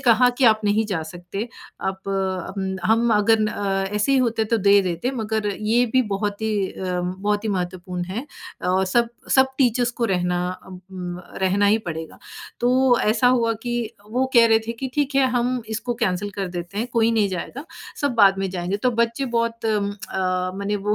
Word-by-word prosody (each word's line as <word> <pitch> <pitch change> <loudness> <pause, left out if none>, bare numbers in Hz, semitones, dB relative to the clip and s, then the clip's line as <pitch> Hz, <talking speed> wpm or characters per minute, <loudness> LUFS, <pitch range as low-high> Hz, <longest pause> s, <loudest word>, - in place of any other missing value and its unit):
कहा 245 -2 +5
कि, 270 - +3
"आप 220 -2 +5
नहीं 210 +2 +2
जा 185 -6 -2
सकते। 175 +7 -6 0.3
आप 190 0 -4
अम, 190 0 -2
हम 230 +1 +3
अगर 215 +1 +3
अ, 195 -2 -1
ऐसे 210 +6 +2
ही 270 - +4
होते, 230 -3 +1
तो 230 +2 +1
दे 200 0 +5
देते। 180 +6 -2
मगर 220 -1 -1
ये 225 +3 +3
भी 260 - +4
बहुत 205 +1 -3
ही 220 0 0 0.2
अ, 180 -1 -3
बहुत 200 +4 -2
ही - - -1
महत्वपूर्ण 180 -2 -3
है। 205 +10 -5 0.3
अ, 185 +1 +1
सब 235 +5 +2 0.2
सब 265 0 +6
टीचर्स 245 -2 +2
को - - +3
रहना 180 -4 0 0.2
अ - - -16
उम, 180 -1 -8 0.2
रहना 195 +2 +2
ही 210 +2 +4
पड़ेगा।" 160 -1 -6 0.4
तो 250 0 +4
ऐसा 220 +3 +3
हुआ 230 -1 +1
कि 240 -1 -2 0.4
वो 255 +3 +1
कह 235 -1 +8
रहे 225 -1 +5
थे 230 - -2
कि, 260 +3 -5
"ठीक 290 -1 0
है, 270 -1 +4
हम 245 0 0
इसको 220 +2 -3
कैंसल 205 -4 -1
कर 195 -2 -4
देते 175 +2 -6
हैं, 230 - -1
कोई 230 -1 +3
नहीं 215 -3 +2
जाएगा। 195 - -5 0.4
सब 285 -3 0
बाद 195 -3 +5
में 195 - -1
जाएँगे।" 180 +1 -2
तो 250 +5 +1
बच्चे 235 +4 -1
बहुत 230 0 -1
अ, 190 -3 -1
मने 200 +1 -1
वो 210 - +3
210 Hz, 195 wpm, -22 LUFS, 190-235 Hz, 0.4 s, कह